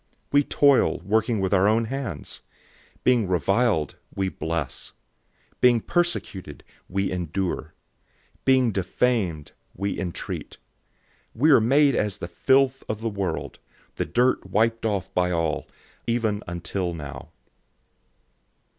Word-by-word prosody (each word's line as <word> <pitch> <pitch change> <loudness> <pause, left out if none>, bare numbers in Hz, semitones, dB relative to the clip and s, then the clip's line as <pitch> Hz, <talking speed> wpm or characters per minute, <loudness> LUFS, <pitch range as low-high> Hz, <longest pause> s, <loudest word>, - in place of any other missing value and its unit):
004:012 - - -44 0.2
We 145 0 +5
toil, 140 -2 +4
working 110 +2 +1
with 95 +1 0
our 95 0 +4
own 115 +2 +3
hands. 120 - -5 0.6
When 120 -5 +3
people 90 - +2
curse - - -8
us, 100 -7 +2 0.2
we 95 -1 0
bless. 80 -7 -4 0.7
Being 120 -2 +5
persecuted, 110 - -2 0.3
we 95 +1 -1
endure. 90 -2 -3 0.6
004:013 - - -45
Being 130 -3 +4
defamed, 95 -4 0 0.2
we 100 +2 -2
entreat. 90 -3 -5 0.8
We 150 +8 +4
are 135 - +7
made 140 +5 +4
as 105 -2 -1
the 85 - -5
filth 135 +9 +2
of 110 0 -3
the 115 - -1
world, 100 -2 -3 0.4
the - - 0
dirt 125 +2 +1
wiped 115 +1 +1
off 100 -3 -2
by 90 0 +2
all, 85 -3 -1 0.4
even 115 -3 0
until 85 +1 -3
now. 75 -4 -8
105 Hz, 130 wpm, -25 LUFS, 90-120 Hz, 0.8 s, are